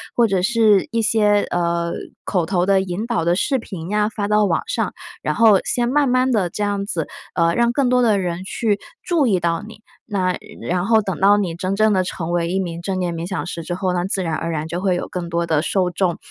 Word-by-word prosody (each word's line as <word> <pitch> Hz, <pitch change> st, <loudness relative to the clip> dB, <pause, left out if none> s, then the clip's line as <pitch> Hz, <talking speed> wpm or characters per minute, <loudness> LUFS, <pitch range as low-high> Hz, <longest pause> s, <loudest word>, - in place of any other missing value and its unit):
或 235 Hz, -1 st, +4 dB
者 195 Hz, -3 st, +1 dB
是 215 Hz, -2 st, +3 dB
一 230 Hz, -1 st, +1 dB
些， 210 Hz, -2 st, +3 dB
呃， 170 Hz, -1 st, 0 dB, 0.3 s
口 180 Hz, -5 st, 0 dB
头 180 Hz, 0 st, +1 dB
的 195 Hz, -1 st, +4 dB
引 190 Hz, +5 st, -4 dB
导 225 Hz, -9 st, 0 dB
的 175 Hz, +1 st, +3 dB
视 265 Hz, +7 st, +1 dB
频 180 Hz, -6 st, -7 dB
呀， 210 Hz, 0 st, +1 dB
发 205 Hz, -2 st, -3 dB
到 210 Hz, 0 st, +3 dB
网 -, -, +1 dB
上， -, -, -1 dB, 0.3 s
然 -, -, -1 dB
后 220 Hz, -4 st, +6 dB
先 240 Hz, -1 st, 0 dB
慢 280 Hz, 0 st, +2 dB
慢 255 Hz, +1 st, +2 dB
地 190 Hz, -5 st, +1 dB
这 210 Hz, -, -3 dB
样 200 Hz, -1 st, -1 dB
子， 165 Hz, -6 st, -3 dB, 0.3 s
呃， 170 Hz, 0 st, +3 dB
让 235 Hz, 0 st, +3 dB
更 270 Hz, 0 st, +1 dB
多 250 Hz, 0 st, +3 dB
的 215 Hz, -5 st, +3 dB
人 180 Hz, 0 st, -3 dB
去 210 Hz, +1 st, -1 dB, 0.3 s
注 335 Hz, -5 st, +2 dB
意 195 Hz, -5 st, +2 dB
到 170 Hz, +2 st, -1 dB
你。 220 Hz, -, -11 dB, 0.3 s
那 185 Hz, -2 st, +1 dB, 0.3 s
然 180 Hz, +2 st, 0 dB
后 225 Hz, -1 st, +4 dB
等 190 Hz, -4 st, -3 dB
到 200 Hz, +2 st, +5 dB
你 185 Hz, -5 st, -1 dB
真 185 Hz, +3 st, -2 dB
正 215 Hz, 0 st, +3 dB
地 185 Hz, -, +2 dB
成 175 Hz, -2 st, -4 dB
为 170 Hz, -1 st, 0 dB
一 190 Hz, -, 0 dB
名 170 Hz, -2 st, -4 dB
正 190 Hz, +1 st, -2 dB
念 180 Hz, -2 st, -1 dB
冥 165 Hz, +1 st, -4 dB
想 185 Hz, -, -3 dB
师 170 Hz, -1 st, -5 dB
之 175 Hz, +2 st, -4 dB
后， 185 Hz, -1 st, -1 dB
那 175 Hz, 0 st, -1 dB
自 190 Hz, -1 st, -1 dB
然 165 Hz, -2 st, -2 dB
而 170 Hz, -, -3 dB
然 155 Hz, -1 st, -3 dB
就 175 Hz, +3 st, -4 dB
会 190 Hz, -2 st, +1 dB
有 -, -, -3 dB
更 175 Hz, -2 st, -5 dB
多 170 Hz, 0 st, 0 dB
的 155 Hz, -2 st, +1 dB
受 180 Hz, +1 st, 0 dB
众、 175 Hz, -1 st, 0 dB
190 Hz, 265 characters per minute, -20 LUFS, 175-215 Hz, 0.3 s, 后